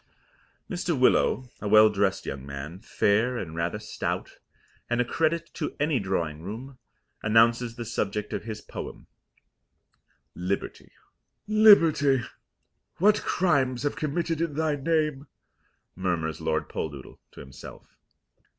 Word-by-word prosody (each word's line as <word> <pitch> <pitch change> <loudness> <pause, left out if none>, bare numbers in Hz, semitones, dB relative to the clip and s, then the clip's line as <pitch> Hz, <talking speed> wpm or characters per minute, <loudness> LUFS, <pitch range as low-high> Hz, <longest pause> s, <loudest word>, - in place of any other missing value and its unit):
Mr. 175 -5 -2
Willow, 130 0 +3
a 105 - -3
well 110 +1 +7
dressed 100 -2 0
young 70 -1 -5
man, 70 +5 -7
fair 115 +3 +1
and 80 -7 -5
rather 85 +4 -1
stout, 105 0 -4 0.5
and 120 0 0
a 125 - +3
credit 165 +5 -1
to - - -4
any 150 -3 +1
drawing 85 -6 -2
room, 120 +8 -8 0.4
announces 115 +2 +3
the 120 -1 -6
subject 105 -2 -3
of - - -3
his 110 -1 -6
poem - - -8 1.3
Liberty. 90 +2 -4 0.6
"Liberty, 165 - +6 0.7
what 210 +4 +4
crimes 135 -8 +1
have 145 - 0
been - - -10
committed 165 +1 -1
in 165 -4 -1
thy 155 -1 +1
name!" 150 -1 0 0.7
murmurs 85 -4 -2
Lord - - -1
Poldoodle 70 -4 -6
to - - -12
himself. 65 0 -12
120 Hz, 125 wpm, -27 LUFS, 95-150 Hz, 1.3 s, well